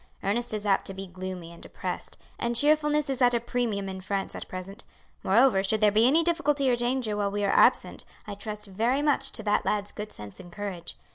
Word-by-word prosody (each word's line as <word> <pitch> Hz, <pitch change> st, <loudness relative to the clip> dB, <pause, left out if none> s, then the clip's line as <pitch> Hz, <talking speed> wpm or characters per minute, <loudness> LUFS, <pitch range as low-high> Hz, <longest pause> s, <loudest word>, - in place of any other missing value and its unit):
Ernest 235 Hz, +5 st, -1 dB
is 215 Hz, -1 st, -4 dB
apt 195 Hz, -2 st, +2 dB
to 195 Hz, -, -6 dB
be 195 Hz, 0 st, -6 dB
gloomy 185 Hz, -2 st, -7 dB
and 170 Hz, -, -13 dB
depressed, -, -, -6 dB, 0.2 s
and 235 Hz, 0 st, -1 dB
cheerfulness 300 Hz, +2 st, +3 dB
is 270 Hz, -1 st, -2 dB
at 245 Hz, -1 st, +5 dB
a -, -, +2 dB
premium 230 Hz, -4 st, -2 dB
in 190 Hz, 0 st, -6 dB
France 195 Hz, +1 st, -3 dB
at -, -, -7 dB
present. 195 Hz, +5 st, -7 dB, 0.4 s
Moreover, 225 Hz, 0 st, +4 dB
should 205 Hz, +3 st, +1 dB
there 210 Hz, -1 st, +5 dB
be 220 Hz, +3 st, +5 dB
any 315 Hz, +5 st, +4 dB
difficulty 295 Hz, -5 st, +1 dB
or -, -, +3 dB
danger 240 Hz, -2 st, 0 dB
while 205 Hz, -1 st, 0 dB
we 205 Hz, +1 st, -2 dB
are 195 Hz, -, +2 dB
absent -, -, +3 dB, 0.2 s
I 210 Hz, -, -6 dB
trust 210 Hz, +1 st, -6 dB
very 230 Hz, +8 st, 0 dB
much 280 Hz, -2 st, +2 dB
to 220 Hz, -, -5 dB
that 205 Hz, 0 st, +2 dB
lad's 205 Hz, -1 st, -1 dB
good 210 Hz, 0 st, -7 dB
sense 105 Hz, -1 st, -9 dB
and 175 Hz, -2 st, -11 dB
courage. 185 Hz, -3 st, -6 dB
210 Hz, 220 wpm, -27 LUFS, 195-245 Hz, 0.4 s, at